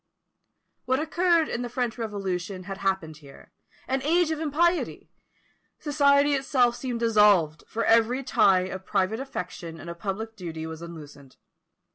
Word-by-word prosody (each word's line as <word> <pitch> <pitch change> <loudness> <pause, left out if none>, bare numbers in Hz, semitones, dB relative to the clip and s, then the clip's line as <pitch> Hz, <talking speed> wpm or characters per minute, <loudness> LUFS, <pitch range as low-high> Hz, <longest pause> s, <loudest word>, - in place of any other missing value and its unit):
What 260 +1 +1
occurred 335 +1 +2
in 235 - -3
the 245 - -4
French 245 -1 -2
Revolution 195 -4 -4
had 195 +1 -7
happened 190 -6 -2
here 140 -3 -16 0.3
an 265 0 -1
age 330 +3 +2
of 315 - -2
impiety! 330 +3 0 0.7
Society 285 -1 +3
itself 260 -3 +2
seemed 240 -1 -4
dissolved, 210 -9 +4
for 230 - -2
every 230 +4 +3
tie 200 -7 +4
of 190 +1 -5
private 195 +3 0
affection 170 -11 -6
and 170 - -7
of 170 - -11
public 220 +3 -4
duty 165 -5 -6
was 160 0 -7
unloosened. 150 -5 -11
220 Hz, 145 wpm, -26 LUFS, 180-270 Hz, 0.7 s, dissolved